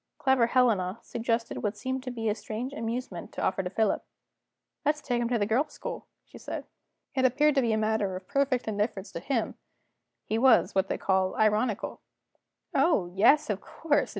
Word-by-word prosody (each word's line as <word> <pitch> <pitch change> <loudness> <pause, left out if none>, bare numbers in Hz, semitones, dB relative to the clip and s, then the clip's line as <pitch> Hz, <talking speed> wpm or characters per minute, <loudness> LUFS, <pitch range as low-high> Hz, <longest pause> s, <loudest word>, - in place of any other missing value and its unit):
Clever 265 -3 +3
Helena 225 -7 +2
suggested 230 0 -2
what 210 0 -2
seemed 260 +4 -3
to 255 - -6
be 230 -2 -3
a 210 - +3
strange 220 +5 -5
amusement 230 -7 -4
to - - -5
offer 190 - +1
to 180 - -4
Philip. 215 +2 +1 0.8
"Let's 300 0 +1
take 245 -5 -1
him 235 - 0
to 245 - +2
the 205 - +1
Girls' 250 +8 0
School," - - -6 0.2
she - - -14
said. - - -6 0.5
It 260 - +1
appeared 290 +4 +4
to 275 - +3
be 235 -3 +1
a 220 - +2
matter 215 -3 0
of 185 0 -8
perfect 275 -4 +1
indifference 205 -2 -2
to - - -5
him; 230 +4 -2 0.7
he 220 - 0
was, 255 -2 +5
what 190 0 +2
they - - -2
call, 190 -1 +1
ironical. 215 0 +1 0.7
"Oh, 195 - +2
yes, 250 +10 +5
of 200 - -3
course. 300 -3 0
230 Hz, 185 wpm, -28 LUFS, 205-260 Hz, 0.8 s, was